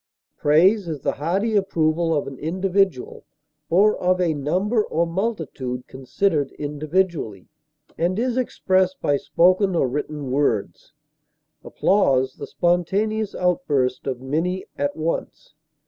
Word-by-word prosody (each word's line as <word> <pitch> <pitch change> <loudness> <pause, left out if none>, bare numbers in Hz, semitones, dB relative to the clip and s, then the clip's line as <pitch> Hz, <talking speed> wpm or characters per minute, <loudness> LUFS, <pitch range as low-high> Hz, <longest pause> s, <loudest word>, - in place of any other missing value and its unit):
Praise 180 +7 +3
is 155 -4 -4
the - - 0
hearty 195 +9 -1
approval 170 -4 +1
of 145 - -1
an 135 - -7
individual, 185 -2 -1 0.5
or 200 +5 +4
of 185 0 +1
a 175 -3 +2
number 185 - 0
or 170 -2 0
multitude 160 - -3
considered 145 +3 -1
individually, 150 - -2 0.5
and 175 +3 +1
is 245 +1 0
expressed 190 -7 +1
by 145 - +1
spoken 185 +6 +2
or 150 - +2
written 150 +1 -4
words; 130 -6 -1 0.7
applause, 135 -10 +1
the - - -7
spontaneous 200 +5 0
outburst 145 -9 0
of 130 -2 -2
many 165 +8 -2
at 145 0 -2
once. 160 -1 -4
170 Hz, 120 wpm, -22 LUFS, 145-190 Hz, 0.7 s, or